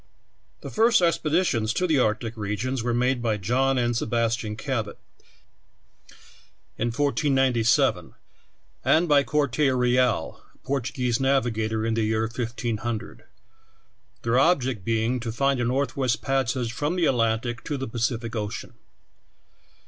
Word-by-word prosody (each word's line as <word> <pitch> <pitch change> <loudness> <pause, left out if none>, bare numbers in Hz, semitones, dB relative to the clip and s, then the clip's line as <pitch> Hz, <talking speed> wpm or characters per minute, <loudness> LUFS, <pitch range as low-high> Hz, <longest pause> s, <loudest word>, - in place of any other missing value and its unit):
The - - -7
first 230 +2 +4
expeditions 160 -9 +1
to 180 - 0
the 155 -6 +2
arctic 110 0 0
regions 110 +5 -3
were 120 +1 -1
made 125 +1 +1
by 110 -3 0
John 130 +7 +1
and 120 -1 +1
Sebastian 115 -1 -1
Cabot, 110 -3 -3 1.8
in 115 - -1
1497, 135 -3 +1 0.7
and 170 +2 +3
bv 145 -2 +4
Corte 145 -5 0
Real, 125 - +1
a - - -27
Portuguese 125 -3 -1
navigator, 110 -5 0
in 115 - 0
the 115 - 0
year 110 0 0
1500; 115 -1 -4 1.0
their 120 +2 +2
object 130 - +2
being 115 +3 0
to 115 -1 -4
find 135 +3 +1
a - - 0
northwest 130 -2 -1
pas 135 -3 0
sage 120 -3 -3
from 145 +7 -1
the 175 -2 +1
Atlantic 120 -1 0
to 145 - -2
the 135 - -4
Pacific 115 0 -2
ocean. 105 0 -5
120 Hz, 130 wpm, -25 LUFS, 115-135 Hz, 1.8 s, first